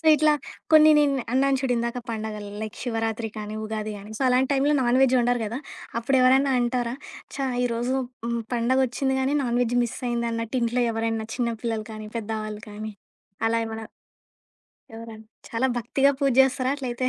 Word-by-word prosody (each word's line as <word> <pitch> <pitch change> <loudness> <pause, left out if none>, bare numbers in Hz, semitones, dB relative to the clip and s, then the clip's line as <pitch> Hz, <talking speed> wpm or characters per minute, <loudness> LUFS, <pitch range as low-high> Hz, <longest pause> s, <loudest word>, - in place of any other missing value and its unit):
So - - -24
ఇట్లా 305 +1 +4 0.4
కొన్ని 310 0 +8
నేను 285 -2 +3 0.2
అన్నాను 270 +1 +3
చూడిందాక 245 -2 -1
పండగలు 215 -2 -5
లైక్ 215 - -6
శివరాత్రి 225 -1 -2
కానీ, 210 0 -5
ఉగాది 215 0 -3
కానీ 205 +2 -11
సో, - - -2
అలాంటి 255 +2 +2
టైంలో 280 +2 +2
నాన్ 245 +1 +3
వెజ్ 260 -1 +4
వండరు 245 0 +2
గదా! 225 +4 -3 0.4
అప్పుడెవరైనా 265 +2 +4
అంటారా? 240 0 0 0.4
చా! 275 - -1 0.2
ఈరోజు 240 +1 -1 0.3
హ్మ్ 235 0 -1
పండగొచ్చింది 260 +2 +1
గానీ 265 +2 +1
నాన్‌వెజ్ 245 -1 +1
మిస్ 240 +1 -3
అయిందన్నట్టు. 235 0 -2
ఇంట్లో 240 +2 +1
ఎవరైనా 225 0 -2
చిన్న 235 -2 0
పిల్లలు 225 -2 -2
కానీ, 215 0 -7
పెద్దవాళ్ళు 215 -1 -4
కానీ 215 +1 -6 0.6
అలా 230 - +1
ఏమైనా 220 0 -6 1.1
ఎవర‌న్న 225 -1 -9 0.2
చాలా 235 +3 0
భక్తిగా 270 +4 +2
పూజ 275 -2 +2
చేస్తారా 265 0 +2
అట్లయితే? 255 -2 -2
240 Hz, 155 wpm, -25 LUFS, 225-265 Hz, 1.1 s, కొన్ని